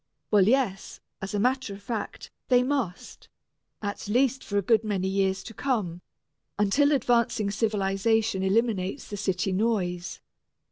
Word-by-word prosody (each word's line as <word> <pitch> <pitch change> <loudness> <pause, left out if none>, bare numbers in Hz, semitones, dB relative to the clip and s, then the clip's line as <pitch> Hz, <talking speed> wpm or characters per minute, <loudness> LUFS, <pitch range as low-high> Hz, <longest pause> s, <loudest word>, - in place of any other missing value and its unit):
Well, 200 -3 +5
yes, 235 -6 0 0.2
as 195 +2 -4
a - - +1
matter 250 -2 0
of 200 - -14
fact 225 0 -5 0.2
they 250 -1 +4
must, 255 -9 -3 0.5
at 205 0 -4
least 255 +4 +2
for 205 - -2
a 200 - +2
good 225 +2 +3
many 195 -3 -1
years 190 0 0
to 225 - -9
come, 205 -11 -2 0.6
until 210 +9 +3
advancing 235 -5 +2
civilization 210 0 +1
eliminates 200 +2 0
the 205 - -6
city 190 -1 -1
noise. 185 -4 -1
210 Hz, 140 wpm, -27 LUFS, 195-235 Hz, 0.6 s, Well